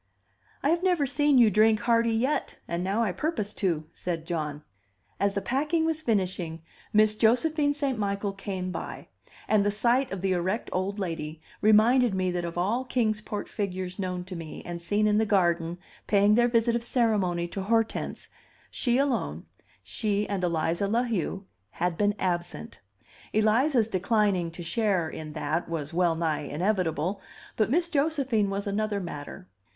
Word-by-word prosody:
"I 285 - +3
have 340 +1 +1
never 355 -6 +2
seen 290 +1 +3
you 230 -4 +6
drink 215 0 +4
hearty 230 -1 +2
yet, 260 +7 -1
and 170 +1 -2
now 200 +5 +1
I 210 - 0
purpose 210 - -2
to," 165 -6 -1
said 165 -3 -4
John. 150 -3 -3 0.6
As 200 0 +1
the 200 - -1
packing 300 +5 +1
was 320 -1 0
finishing 185 - -1 0.3
Miss 215 0 +5
Josephine 285 +7 +2
St. 275 -5 -1
Michael 200 0 -1
came 190 -2 -4
by; - - -6 0.4
and 215 -2 +3
the 205 - +2
sight 240 +6 +2
of 195 -2 -4
the 190 0 0
erect 185 +5 -1
old 190 +2 -1
lady 160 -5 -4 0.2
reminded 220 +2 +5
me 185 -1 0
that 175 -1 -2
of 170 0 -6
all 210 +8 +1
Kings 220 -4 0
Port 210 -1 -5
figures 185 -2 -4
known 180 -2 -2
to 185 0 -8
me 165 -2 -7
and 170 -1 -5
seen 205 +5 +1
in 210 0 +3
the - - +3
garden 175 -4 +1 0.3
paying 205 0 +4
their 240 +2 +4
visit 235 0 +2
of 235 - -1
ceremony 205 -8 +1
to 195 - -4
Hortense, 225 +3 -1 0.4
she 245 -1 +1
alone 275 -3 -1 0.4
she 210 -1 -1
and 195 -2 -2
Eliza 170 +2 0
La 230 +4 +2
Heu 200 -4 -2 0.3
had 175 -1 -1
been 205 +2 +1
absent. 175 -2 -3 0.5
Eliza's 225 +3 +3
declining 195 -3 +1
to 165 +1 -8
share 190 -2 +1
in 155 -1 -7
that 160 +5 -2
was 160 -1 -4
well 175 -1 +2
nigh 160 -2 -1
inevitable, 180 +2 -1 0.3
but 215 -2 +1
Miss 340 +6 +2
Josephine 275 - +1
was 200 +1 -3
another 205 0 -1
matter. 145 - -7
205 Hz, 165 wpm, -27 LUFS, 175-230 Hz, 0.6 s, you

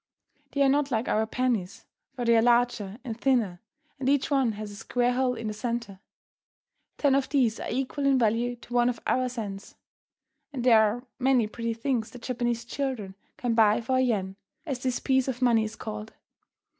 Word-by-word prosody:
They 280 - +3
are - - +5
not 285 +1 +2
like 230 -2 -1
our 220 +1 +1
pennies, 225 -5 -2 0.3
for 245 -2 -3
they 235 0 +5
are 225 - +5
larger 235 -4 +2
and 235 -4 -4
thinner, 225 -10 +1 0.4
and 265 0 0
each 285 +1 +1
one 265 -5 +2
has 210 0 -7
a - - -10
square 245 +3 0
hole 250 0 +1
in 230 - -6
the 215 - -2
centre. 230 -3 -4 1.0
Ten 285 -2 +3
of 270 -1 +1
these 250 -6 +2
are - - -5
equal 270 +3 -1
in 270 -1 +4
value 235 +1 +1
to 240 0 -13
one 240 0 +4
of 240 -2 -3
our 255 0 +1
cents, 205 -5 -6 0.8
and 260 -4 -4
there 230 -3 +6
are 220 +3 0 0.2
many 255 -3 +3
pretty 230 +1 -4
things 230 -1 -1
that 245 - -12
Japanese 240 -2 -2
children 245 -8 -3 0.2
can 245 -2 -1
buy 220 -2 +4
for 255 +3 0
a - - +3
yen, 195 -6 -1 0.3
as 275 -6 -3
this 255 -1 -1
piece 265 -1 +1
of 255 -2 -3
money 235 -3 +4
is 215 +1 -6
called. 215 0 -7
240 Hz, 195 wpm, -27 LUFS, 220-255 Hz, 1.0 s, there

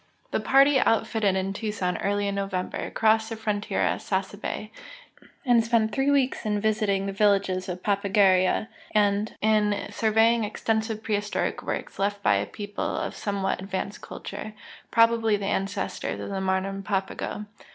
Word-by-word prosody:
The - - +1
part}" 275 +1 +5
out 260 -6 +3
fitted 215 -4 0
in 190 +1 -1
Tucson 200 -4 -2
early 205 0 0
in 200 - -1
November, 195 -2 -3
cro.ssed 220 0 +2
the 225 - -4
frontier 210 -1 -2
at - - +1
Sasahe, 200 +2 -3 0.7
and 240 -3 +5
spent 225 -1 +2
three 270 +6 +1
weeks 275 -2 +2
in 210 -2 0
visiting 210 -2 +1
the 200 - -2
villages 195 -2 +1
of 180 0 -5
Papagueria 200 -1 +3 0.3
and 205 0 +2
in 210 -1 +2
surveying 225 +2 +3
extensive 220 +1 -2
prehistoric 205 -1 -1
works - - -5
left 200 +1 -1
by - - +4
a - - -2
people 205 -1 -4
of - - -3
some 200 -2 -3
what 190 - 0
advanced 195 +1 -4
culture, 215 - -7 0.4
probably 230 -2 +4
the 200 - -5
ancestors 195 0 -2
of - - -5
the 195 -1 -2
modern 190 +1 -1
Papago. 195 +1 -3
205 Hz, 155 wpm, -26 LUFS, 195-220 Hz, 0.7 s, part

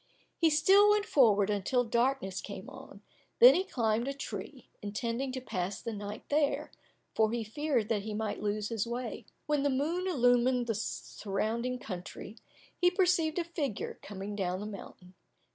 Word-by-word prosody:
He 330 - +5
still 385 +7 +6
went 415 -1 +3
forward, 210 - +4
until 210 +5 +1
darkness 235 -4 0
came - - -8
on, - - -12 0.3
then 485 +1 +10
he 370 - +1
climbed 230 - 0
a 275 - -2
tree, 255 +1 -7
intending 230 +5 -3
to 260 - -3
pass 195 -6 -3
the 230 - -5
night 205 0 -6
there, 290 -1 +1 0.4
for 220 -1 +2
he 235 -1 -1
feared 245 0 -1
that 215 -3 +1
he 210 +1 -5
might 215 -1 -3
lose 210 0 -1
his 230 -1 -1
way. 240 0 -5 0.2
When 295 -1 +1
the 285 - +2
moon 320 +8 0
illumined 245 -5 +3
the 230 - 0
surrounding 220 +3 -3
country 195 +1 -8 0.4
he 355 - +5
perceived 355 -3 +2
a 350 - +1
figure 300 -10 -4
coming 205 0 -6
down 185 -2 -1
the 205 - -5
mountain. 190 -3 -10
235 Hz, 165 wpm, -31 LUFS, 210-285 Hz, 0.4 s, then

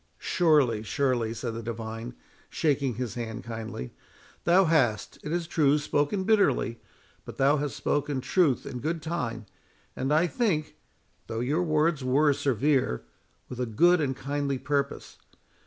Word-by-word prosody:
"Surely, 145 -10 +2
surely,"—said 115 -1 -1
the 115 - -5
divine, 115 +1 -6 0.3
shaking 140 -5 0
his 120 -2 -4
hand 115 0 -5
kindly; 110 - -6 0.5
"thou 185 +3 +5
hast, 135 -10 +1
it 150 - -5
is 175 0 -1
true, 150 -3 +3
spoken 150 +6 0
bitterly, 185 - +2 0.4
but - - -10
thou 140 +3 +4
hast 145 -1 -3
spoken 145 -2 -1
truth 150 -1 +2
in 125 - -5
good 160 +4 -3
time; 125 -9 -3 0.5
and 135 +2 -2
I 155 +3 +4
think—though 155 - -4
your 145 +8 0
words 155 -3 +1
were 140 +3 +3
severe—with 135 - -2
a 125 - -1
good 170 +10 +4
and 135 -3 -1
kindly 140 +1 -2
purpose. 140 +1 -3
140 Hz, 135 wpm, -27 LUFS, 120-155 Hz, 0.5 s, thou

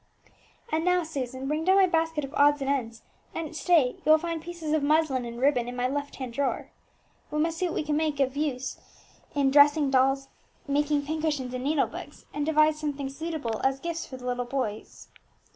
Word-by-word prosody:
"And 320 +1 +1
now, 360 0 +3
Susan, 265 -4 -4
bring 305 +2 -1
down 375 +3 +4
my 390 -1 +6
basket 325 -4 0
of 275 - -11
odds 290 +1 +4
and 270 - -3
ends, 230 -5 -3 0.3
and 325 -1 -4
stay 315 -7 +3
you 310 - +4
will 315 - +8
find 335 0 -4
pieces 335 -2 -4
of 315 - +2
muslin 290 -4 +2
and 235 0 -7
ribbon 255 -3 +2
in 245 - -5
my 250 0 0
left 285 +2 -3
hand 255 -3 -6
drawer. 280 +2 -2 0.6
We 300 - -3
must 330 +2 0
see 365 - +1
what 335 - -4
we - - 0
can 295 0 0
make 310 -2 0 0.2
use 275 -4 -2
of - - -27 0.5
in 275 -1 +3
dressing 290 0 +5
dolls, 270 +1 +2 0.4
making 290 0 +1
pincushions 300 -4 -2
and 255 0 -4
needle 285 0 +2
books, - - -10
and 295 0 -2
devise 310 -1 +3
something 285 -3 -3
suitable 285 -6 -4
as 270 0 +1
gifts 335 +2 -4
for 260 - -8
the 250 - -11
little 245 0 -1
boys." 240 -5 -4
290 Hz, 205 wpm, -27 LUFS, 265-315 Hz, 0.6 s, will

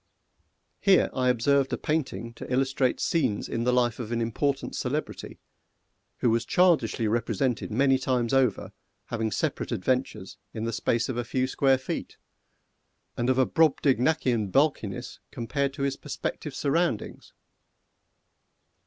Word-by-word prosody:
Here 195 -2 +4
I 130 -1 +1
observed 135 +3 +2
a - - -1
painting 135 -6 -2
to 115 - -9
illustrate 130 0 +1
scenes 130 -11 0
in 115 0 -2
the 125 - +3
life 120 -2 +1
of 115 -2 -5
an 120 - 0
important 135 +5 -1
celebrity, - - -4 0.8
who 120 - +3
was 115 0 +1
childishly 170 -10 +2
represented 115 +2 -1
many 135 +4 +3
times 125 -2 0
over 130 -6 +1 0.4
having 110 -2 -1
separate - - -2
adventures 125 -3 -2 0.2
in 110 - -3
the 115 0 -2
space 115 +1 0
of 130 - -3
a 120 - -1
few 130 +2 -1
square 135 0 +2
feet, 130 - -5 1.0
and 120 +1 -1
of 130 - +2
a 130 - +4
Brobdingnacian 135 - +2
bulkiness 135 -8 0
compared 140 +4 -2
to 140 - -3
his 140 0 -1
perspective 145 0 -5
surroundings. 150 -4 -1
130 Hz, 135 wpm, -27 LUFS, 115-140 Hz, 1.0 s, Here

